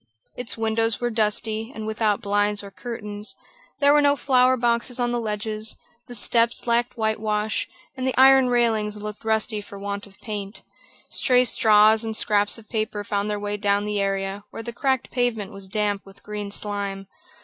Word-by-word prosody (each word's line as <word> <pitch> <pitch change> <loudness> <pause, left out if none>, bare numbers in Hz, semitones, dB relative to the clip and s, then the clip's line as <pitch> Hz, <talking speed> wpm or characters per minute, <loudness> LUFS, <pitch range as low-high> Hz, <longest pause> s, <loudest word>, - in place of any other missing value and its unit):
Its 245 -2 -4
windows 225 0 0
were 240 0 -1
dusty, 220 +1 0
and 220 - -5
without 215 -1 0
blinds 205 0 +1
or 200 - -9
curtains, 210 -2 -5 0.4
there 285 0 +5
were 295 - +5
no 285 0 +4
flower 255 -2 +3
boxes 235 +1 +1
on 240 -1 +1
the 240 - 0
ledges, 215 0 -2 0.3
the 245 - -6
steps 230 +2 +2
lacked 240 +1 +1
whitewash, 215 -1 -1 0.3
and 260 -1 -3
the 260 - -1
iron 265 0 +7
railings 220 -3 +1
looked 210 0 -7
rusty 220 -1 +1
for 200 0 -10
want 200 +1 -5
of 195 -1 -20
paint. 205 -2 -6 0.5
Stray 250 0 +3
straws 215 -1 +5
and 220 -1 -2
scraps 205 -1 +2
of 220 -1 -14
paper 215 -2 -2
found 205 0 -2
their 210 0 -2
way 205 0 -3
down 205 0 +1
the 210 -1 -1
area, 195 0 -2
where 225 - -8
the 235 +1 -6
cracked 265 0 -1
pavement 245 -5 -1
was 195 -1 -6
damp 205 0 -1
with 195 0 -16
green 210 -1 -5
slime. 200 -1 -3
215 Hz, 180 wpm, -24 LUFS, 205-235 Hz, 0.5 s, iron